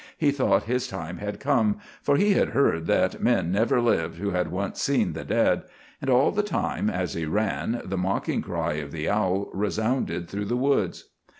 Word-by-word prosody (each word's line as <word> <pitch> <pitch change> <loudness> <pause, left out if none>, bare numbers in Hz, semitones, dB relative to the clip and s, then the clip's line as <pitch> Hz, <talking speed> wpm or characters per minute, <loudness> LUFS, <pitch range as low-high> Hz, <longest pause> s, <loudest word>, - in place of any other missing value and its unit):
He 150 -3 +3
thought 110 -8 +2
his 125 +2 -1
time 90 -2 -6
had 105 0 -5
come, 125 -7 +2 0.2
for 145 0 +2
he 205 +3 +4
had - - +2
heard 80 -12 +2
that - - +1
men 85 - +2
never 110 +5 +2
lived 85 -9 +1
who 100 +3 -2
had 90 -3 0
once 95 +2 -3
seen - - +1
the - - -5
dead; - - +2 0.4
and 135 - -2
all 130 +1 +4
the 210 - +1
time, 210 0 -1
as 225 - -2
he 85 - -2
ran, 110 +5 -1
the 95 +1 -3
mocking 95 +2 -1
cry - - -2
of 75 -2 -5
the 80 -1 -4
owl 100 -1 0
resounded 105 -2 -1
through 100 +3 -4
the 120 - -1
woods. 125 -9 0
105 Hz, 195 wpm, -26 LUFS, 90-125 Hz, 0.4 s, he